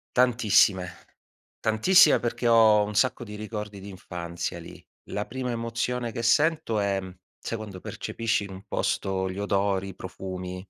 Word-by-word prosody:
Tantissime, 110 Hz, -7 st, +4 dB, 0.7 s
tantissime, 150 Hz, -, +5 dB
perché 120 Hz, 0 st, -3 dB
ho 110 Hz, -2 st, +6 dB
un 105 Hz, 0 st, -5 dB
sacco 130 Hz, +1 st, +2 dB
di 105 Hz, -2 st, -9 dB
ricordi 105 Hz, -1 st, -6 dB
d'infanzia 90 Hz, -3 st, -6 dB
lì. 85 Hz, -, -12 dB, 0.2 s
La 105 Hz, -, -4 dB
prima 125 Hz, 0 st, -4 dB
emozione 120 Hz, +1 st, -2 dB
che 115 Hz, -, -4 dB
sento 145 Hz, -3 st, +2 dB
è: 100 Hz, -1 st, 0 dB, 0.4 s
sai 115 Hz, -, -4 dB
quando 100 Hz, -4 st, -8 dB
percepisci 115 Hz, +1 st, -2 dB
in 100 Hz, -, -8 dB
un 95 Hz, +1 st, -10 dB
posto 95 Hz, -1 st, -1 dB
gli 95 Hz, -, -6 dB
odori, 100 Hz, -1 st, 0 dB
i 95 Hz, -, -10 dB
profumi. 90 Hz, 0 st, -6 dB
105 Hz, 145 wpm, -26 LUFS, 95-115 Hz, 0.7 s, ho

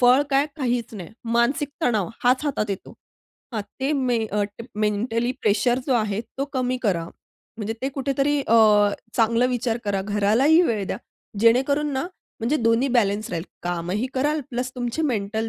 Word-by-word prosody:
फळ 250 Hz, +3 st, +6 dB
काय? 275 Hz, +2 st, +3 dB
काहीच 245 Hz, -5 st, -1 dB
नाही. 185 Hz, -5 st, -7 dB, 0.3 s
मानसिक 265 Hz, +5 st, +2 dB
तणाव 220 Hz, -, +1 dB, 0.2 s
हाच 255 Hz, +4 st, +3 dB
हातात 235 Hz, -8 st, -1 dB
येतो 195 Hz, -, -6 dB, 0.6 s
हां. 215 Hz, -3 st, -2 dB, 0.2 s
ते 275 Hz, +3 st, +1 dB
मे 255 Hz, -4 st, +1 dB
अ, 210 Hz, 0 st, -1 dB, 0.3 s
मेंटली 225 Hz, +3 st, 0 dB
प्रेशर 240 Hz, +4 st, +2 dB
जो 260 Hz, -, +2 dB
आहे 215 Hz, -2 st, 0 dB, 0.2 s
तो 275 Hz, -, +1 dB
कमी 255 Hz, -1 st, 0 dB
करा. 180 Hz, -7 st, +1 dB, 0.5 s
म्हणजे 220 Hz, 0 st, -3 dB
ते 270 Hz, -, +1 dB
कुठेतरी 275 Hz, +1 st, +1 dB
अ, 230 Hz, -, +1 dB, 0.6 s
चांगला 230 Hz, +1 st, +3 dB
विचार 245 Hz, -2 st, -1 dB
करा. 200 Hz, -2 st, 0 dB
घरालाही 215 Hz, -, +3 dB
वेळ 220 Hz, -, 0 dB
द्या. -, -, -2 dB, 0.4 s
जेणेकरून 270 Hz, +6 st, +3 dB
ना 265 Hz, +4 st, -1 dB, 0.3 s
म्हणजे 250 Hz, +7 st, +1 dB
दोन्ही 230 Hz, +2 st, +2 dB
बॅलन्स 215 Hz, -4 st, +1 dB
राहील. 165 Hz, +1 st, -3 dB, 0.2 s
कामही 175 Hz, +6 st, -2 dB
कराल 295 Hz, +3 st, +1 dB
प्लस 250 Hz, +1 st, -2 dB
तुमचे 245 Hz, +5 st, -2 dB
मेंटल 220 Hz, -5 st, -1 dB
240 Hz, 160 wpm, -23 LUFS, 210-265 Hz, 0.6 s, फळ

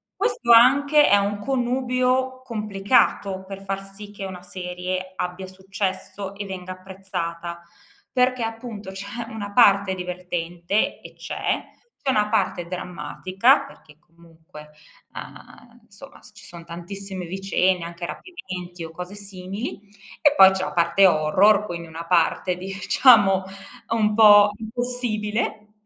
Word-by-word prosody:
questo 235 Hz, -, 0 dB
anche 280 Hz, +6 st, +6 dB
è -, -, +6 dB
un 200 Hz, +1 st, -1 dB
connubio 255 Hz, +2 st, 0 dB
complicato 205 Hz, -4 st, 0 dB
per 195 Hz, 0 st, -9 dB
far 195 Hz, 0 st, -4 dB
sì 205 Hz, +1 st, -10 dB
che 200 Hz, -1 st, -7 dB
una 185 Hz, -2 st, -8 dB
serie 180 Hz, +1 st, -5 dB
abbia 180 Hz, +1 st, -4 dB
successo 190 Hz, +1 st, -5 dB
e 200 Hz, 0 st, -6 dB
venga 185 Hz, -1 st, -7 dB
apprezzata, 180 Hz, -2 st, -6 dB, 0.5 s
perché 255 Hz, -1 st, +1 dB
appunto 225 Hz, -3 st, -6 dB
c'è 200 Hz, +4 st, -6 dB
una 205 Hz, -3 st, -7 dB
parte 200 Hz, -5 st, +5 dB
divertente, 180 Hz, +1 st, -3 dB
e -, -, -12 dB
c'è, -, -, -3 dB, 0.4 s
c'è 275 Hz, -, -2 dB
una 210 Hz, -5 st, +2 dB
parte 190 Hz, -5 st, 0 dB
drammatica, 185 Hz, +7 st, 0 dB
perché 155 Hz, -, -18 dB
comunque, 160 Hz, -2 st, -16 dB, 0.4 s
uhm, 240 Hz, 0 st, -12 dB
insomma 225 Hz, +5 st, -14 dB
s -, -, -15 dB
ci -, -, -15 dB
son 170 Hz, -1 st, -11 dB
tantissime 185 Hz, +2 st, -7 dB
vicende 190 Hz, -1 st, 0 dB
anche 170 Hz, 0 st, -6 dB
rapimenti 180 Hz, -, -8 dB
o 165 Hz, -, -7 dB
cose 180 Hz, +3 st, -8 dB
simili, 200 Hz, +2 st, -6 dB, 0.4 s
e 290 Hz, -, +4 dB
poi 190 Hz, -8 st, +9 dB
c'è 190 Hz, -1 st, -2 dB
la -, -, -4 dB
parte 170 Hz, +3 st, +4 dB
horror 190 Hz, +6 st, +4 dB
quindi 170 Hz, -2 st, -6 dB
una 165 Hz, +1 st, -8 dB
parte 180 Hz, +1 st, +1 dB
diciamo 195 Hz, +1 st, +4 dB, 0.5 s
un 215 Hz, -2 st, +1 dB
po' 210 Hz, -2 st, +8 dB
impossibile, 220 Hz, -2 st, -3 dB
195 Hz, 130 wpm, -23 LUFS, 180-220 Hz, 0.5 s, poi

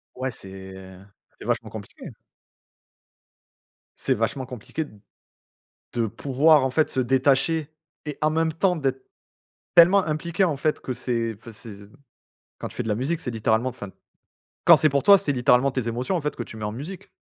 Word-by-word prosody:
Ouais 130 Hz, +1 st, -2 dB
c'est 95 Hz, -2 st, -10 dB, 0.7 s
c'est -, -, -10 dB
vachement -, -, -1 dB
compliqué. -, -, -9 dB, 1.9 s
C'est 135 Hz, -, 0 dB
vachement 125 Hz, +3 st, -2 dB
compliqué 125 Hz, +6 st, -5 dB
d 105 Hz, -, -17 dB, 1.0 s
de 115 Hz, -2 st, 0 dB
pouvoir 145 Hz, +5 st, +3 dB
en 130 Hz, -, -1 dB
fait 155 Hz, +3 st, +2 dB
se -, -, -1 dB
détacher 135 Hz, +5 st, +2 dB, 0.4 s
et 150 Hz, -1 st, -5 dB
en 155 Hz, -, +3 dB
même 160 Hz, +1 st, +1 dB
temps 180 Hz, +3 st, +1 dB
d'être 135 Hz, -4 st, -2 dB, 0.7 s
tellement 180 Hz, +3 st, +7 dB
impliqué, 165 Hz, +4 st, -1 dB
en 155 Hz, -6 st, +1 dB
fait, 155 Hz, +2 st, -1 dB
que -, -, -5 dB
c'est 115 Hz, -3 st, -2 dB
enfin 115 Hz, -, -11 dB
c'est 105 Hz, -2 st, -10 dB, 0.8 s
quand -, -, -5 dB
tu -, -, -15 dB
fais 125 Hz, -, -1 dB
de -, -, -4 dB
la 105 Hz, -, +1 dB
musique 140 Hz, +9 st, -1 dB
c'est 125 Hz, -, -4 dB
littéralement 110 Hz, +3 st, +1 dB
enfin, 105 Hz, -4 st, -9 dB, 0.8 s
quand -, -, +9 dB
c'est 155 Hz, -, +3 dB
pour 140 Hz, -1 st, +1 dB
toi 200 Hz, -1 st, +8 dB
c'est 185 Hz, -7 st, -1 dB
littéralement 125 Hz, +1 st, +3 dB
tes 130 Hz, -3 st, -3 dB
émotions 125 Hz, +10 st, -2 dB
en 165 Hz, -, -1 dB
fait 150 Hz, -, -3 dB
que 120 Hz, -, -4 dB
tu 110 Hz, -, -11 dB
mets 105 Hz, -, -5 dB
en 105 Hz, -, -2 dB
musique 155 Hz, -, -8 dB
130 Hz, 180 wpm, -24 LUFS, 115-155 Hz, 1.9 s, quand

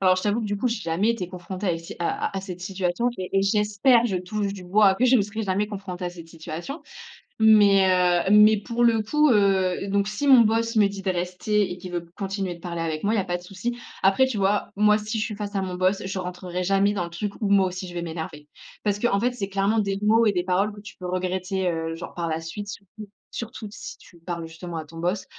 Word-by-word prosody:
Alors, 185 Hz, -1 st, +4 dB
je 185 Hz, -, -2 dB
t'avoue 210 Hz, +2 st, +1 dB
que, 220 Hz, -, -3 dB
du 205 Hz, 0 st, -2 dB
coup, 245 Hz, +5 st, 0 dB
j'ai 230 Hz, -2 st, -2 dB
jamais 175 Hz, +5 st, +1 dB
été 195 Hz, -7 st, -3 dB
confrontée 185 Hz, +2 st, -6 dB
à, 180 Hz, -, +2 dB
ici, 165 Hz, 0 st, -6 dB
à 170 Hz, -, -1 dB
à -, -, -8 dB
à -, -, -4 dB
cette 185 Hz, -2 st, -8 dB
situation 185 Hz, +4 st, -1 dB
et 185 Hz, -1 st, -4 dB
et -, -, +2 dB
j'espère, 210 Hz, +4 st, +3 dB
je 195 Hz, -5 st, -1 dB
touche 200 Hz, +2 st, -2 dB
du 190 Hz, -2 st, -9 dB
bois, 195 Hz, +2 st, +4 dB
que 235 Hz, -, +1 dB
je 255 Hz, +1 st, +6 dB
ne 215 Hz, -, +3 dB
serai 215 Hz, +2 st, -4 dB
jamais 200 Hz, +1 st, 0 dB
confrontée 195 Hz, -3 st, -6 dB
à -, -, -3 dB
cette 170 Hz, -2 st, -12 dB
situation. 165 Hz, -, -7 dB, 0.6 s
Mais, 205 Hz, -3 st, +6 dB, 0.4 s
heu, -, -, +2 dB
mais 210 Hz, +1 st, +7 dB
pour 235 Hz, +3 st, -2 dB
le 230 Hz, -2 st, +4 dB
coup, 300 Hz, +7 st, +3 dB
heu, 195 Hz, -4 st, +2 dB
donc 200 Hz, 0 st, +1 dB
si 210 Hz, +7 st, -2 dB
mon 260 Hz, -3 st, +8 dB
boss 230 Hz, +1 st, +1 dB
me 210 Hz, -2 st, +6 dB
dit 200 Hz, 0 st, -7 dB
de 190 Hz, -, 0 dB
rester 185 Hz, +3 st, -1 dB
et 180 Hz, -, -5 dB
qu'il 180 Hz, 0 st, -9 dB
veut 170 Hz, -1 st, -3 dB
continuer 195 Hz, -2 st, -3 dB
de -, -, -16 dB
parler 170 Hz, -1 st, -5 dB
avec 160 Hz, -2 st, -3 dB
moi, 210 Hz, +2 st, +2 dB
il -, -, +1 dB
y -, -, +3 dB
a -, -, 0 dB
pas 175 Hz, -1 st, -2 dB
de 175 Hz, -, -14 dB
souci. 195 Hz, +6 st, -4 dB, 0.3 s
Après, 195 Hz, +7 st, +5 dB
tu 260 Hz, -4 st, -3 dB
vois, 200 Hz, +1 st, +1 dB
moi, 210 Hz, +1 st, +4 dB
si 215 Hz, +1 st, -3 dB
je -, -, +1 dB
suis 215 Hz, -, -4 dB
face 205 Hz, 0 st, -6 dB
à 195 Hz, -, +1 dB
mon 185 Hz, -1 st, -4 dB
boss, 185 Hz, +2 st, +1 dB
je 190 Hz, 0 st, -4 dB
rentrerais 180 Hz, 0 st, -4 dB
jamais 195 Hz, +2 st, +2 dB
dans 190 Hz, -4 st, -1 dB
le -, -, -8 dB
truc 200 Hz, +4 st, -4 dB
où 210 Hz, -, -1 dB
moi 195 Hz, -1 st, +4 dB
aussi, 185 Hz, +1 st, -6 dB
je 175 Hz, -, -9 dB
vais 175 Hz, -, -3 dB
m'énerver. 160 Hz, -2 st, -6 dB, 0.4 s
Parce 205 Hz, -1 st, 0 dB
qu'en 205 Hz, -3 st, +2 dB
fait, 245 Hz, +4 st, +1 dB
c'est 205 Hz, -5 st, -4 dB
clairement 200 Hz, +3 st, +1 dB
des 200 Hz, -2 st, 0 dB
mots 225 Hz, +2 st, +4 dB
et 210 Hz, -, +4 dB
des 180 Hz, -2 st, 0 dB
paroles 195 Hz, +3 st, +1 dB
que 205 Hz, -, -11 dB
tu 215 Hz, -, -11 dB
peux 180 Hz, -, -8 dB
regretter, 185 Hz, +1 st, -1 dB
heu, 165 Hz, -1 st, -3 dB
genre, 165 Hz, -, -8 dB
par 170 Hz, -1 st, -2 dB
la 160 Hz, 0 st, -2 dB
suite, 205 Hz, +6 st, -6 dB
surtout, 205 Hz, +1 st, -10 dB, 0.2 s
surtout 230 Hz, -1 st, -6 dB
si -, -, -9 dB
tu 175 Hz, -, -18 dB
parles, 170 Hz, -1 st, -5 dB
justement, 165 Hz, +1 st, -7 dB
à 160 Hz, -, -5 dB
ton 165 Hz, +2 st, -13 dB
boss. 180 Hz, +4 st, -1 dB
195 Hz, 265 wpm, -24 LUFS, 180-210 Hz, 0.6 s, mon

